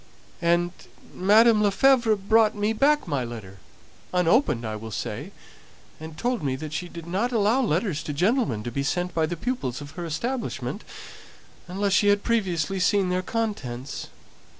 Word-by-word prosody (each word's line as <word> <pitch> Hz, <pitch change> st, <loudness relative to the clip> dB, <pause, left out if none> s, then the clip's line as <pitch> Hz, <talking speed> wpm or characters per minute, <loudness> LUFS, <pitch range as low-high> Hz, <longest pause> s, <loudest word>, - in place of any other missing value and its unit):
"And 175 Hz, +1 st, +2 dB, 0.4 s
Mdme. 215 Hz, +3 st, +5 dB
Lefevre 230 Hz, +2 st, +4 dB
brought 215 Hz, +2 st, +3 dB
me 210 Hz, +1 st, 0 dB
back 295 Hz, +4 st, +2 dB
my 140 Hz, -5 st, -1 dB
letter, 110 Hz, -5 st, -8 dB, 0.5 s
unopened, 180 Hz, -, +2 dB
I 110 Hz, -1 st, -3 dB
will 110 Hz, +1 st, -7 dB
say; 110 Hz, -, -5 dB, 0.7 s
and 160 Hz, 0 st, -9 dB
told 245 Hz, +4 st, -1 dB
me 135 Hz, -3 st, -1 dB
that 155 Hz, +2 st, -7 dB
she 175 Hz, +4 st, -4 dB
didn't 170 Hz, 0 st, -9 dB
allow 230 Hz, +3 st, +2 dB
letters 180 Hz, -, 0 dB
to -, -, -3 dB
gentlemen 175 Hz, -, +1 dB
to 120 Hz, -, -4 dB
be 140 Hz, -, -2 dB
sent 175 Hz, +5 st, -1 dB
by 160 Hz, -1 st, +1 dB
the 175 Hz, +1 st, -4 dB
pupils 180 Hz, -, -3 dB
of 145 Hz, -1 st, -9 dB
her 175 Hz, +2 st, -6 dB
establishment 165 Hz, -, -3 dB, 0.8 s
unless 195 Hz, +2 st, -1 dB
she 205 Hz, -, +4 dB
had 205 Hz, 0 st, +3 dB
previously 195 Hz, -6 st, 0 dB
seen 190 Hz, +1 st, +2 dB
their 180 Hz, 0 st, 0 dB
contents. 185 Hz, -, -4 dB
180 Hz, 155 wpm, -25 LUFS, 150-220 Hz, 0.8 s, Mdme